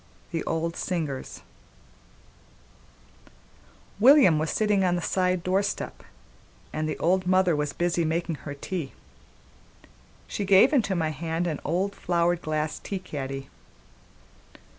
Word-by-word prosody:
XI. 165 - -1
The - - -4
Old 165 +1 -2
Singers 155 -8 -4 2.6
WILLIAM 245 - +7
WAS 155 0 -1
sitting 210 -3 +2
on 180 -1 +2
the 175 - -2
side 180 -2 0
door 185 +2 +2
step, 205 - -4 0.7
and 155 0 -2
the - - -3
old 185 +2 +1
mother 185 -2 +3
was 150 -1 -1
busy 175 0 0
making 165 0 -1
her 145 -1 -6
tea; 155 -1 -5 1.3
she - - -3
gave 200 +8 +5
into 215 -9 +2
my 160 -3 0
hand 165 +3 -2
an 160 -4 -2
old 185 +5 -1
flowered 175 -1 0
glass 155 0 -2
tea 200 - -4
caddy. 135 -6 -6
175 Hz, 130 wpm, -26 LUFS, 155-185 Hz, 2.6 s, WILLIAM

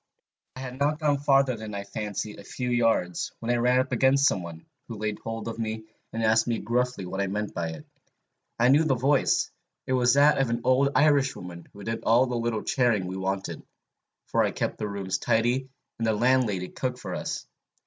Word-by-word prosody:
"I 130 - -7
had 130 0 -7
not 145 +2 +1
gone 145 -3 +1
farther, 135 -2 +3
I 105 -2 -5
fancy, 105 +1 -4
than - - -13
a - - -14
few 125 +4 -4
yards, 115 -7 +1
when 115 +1 -2
I 120 - +2
ran 125 +1 +3
up 130 +1 -1
against 130 +3 +3
some 95 - +1
one, 85 -1 -9 0.2
who 115 - -7
laid 105 0 -3
hold 115 0 -5
of 115 0 -5
me, 110 -1 -3 0.3
and 115 0 -3
asked 110 +1 +3
me 115 -1 0
gruffly 125 -3 -1
what 95 +2 -3
I 100 - 0
meant 105 +2 -3
by 85 -1 -2
it. 75 -2 -11 0.7
I 120 +2 +4
knew 145 +4 +5
the 145 -4 +2
voice: 135 +3 +2 0.3
it 130 - -1
was 125 0 +3
that 145 +1 +5
of 135 -3 +1
an 120 0 -1
old 130 +2 +3
Irishwoman 135 - +1
who 100 - -12
did 115 +2 -3
all 120 +3 +4
the 125 -1 -3
little 115 -2 -1
charing 120 -7 +1
we 90 +1 -5
wanted, 95 0 -3 0.6
for - - +1
I - - +2
kept - - -3
the 105 - -2
rooms 100 -2 -3
tidy, 120 +3 +1 0.3
and 115 - 0
the 110 - +3
landlady 110 -5 +1
cooked 125 -1 -3
for - - -6
us. - - -4
115 Hz, 210 wpm, -26 LUFS, 105-130 Hz, 0.7 s, knew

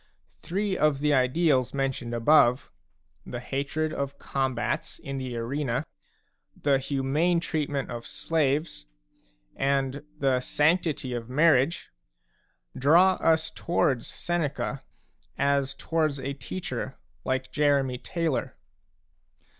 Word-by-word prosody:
Three 195 +2 -1
of 150 -4 +2
the 150 +1 +1
ideals 130 0 +2
mentioned 135 -3 -2
above, 125 0 +4 0.5
the 120 - -6
hatred 140 +5 -2
of 140 0 -3
combats 135 +2 -2
in 135 0 -5
the 125 -2 -4
arena, 125 +2 -2 0.7
the 140 -2 +3
humane 145 +6 +1
treatment 145 -5 -2
of 120 0 -6
slaves, 150 - -1 0.7
and 135 0 0 0.2
the 135 -3 +2
sanctity 150 -1 +1
of 120 -1 -5
marriage, 150 +2 +3 0.8
draw 170 +8 +5
us 160 -1 +2
towards 150 -8 0
Seneca 150 -4 -2 0.6
as 140 -1 +1
towards 155 -4 -1
a 135 +1 -3
teacher 135 -1 -5 0.3
like 130 0 -2
Jeremy 140 -4 +2
Taylor. 165 -4 -2
140 Hz, 105 wpm, -27 LUFS, 130-155 Hz, 0.8 s, draw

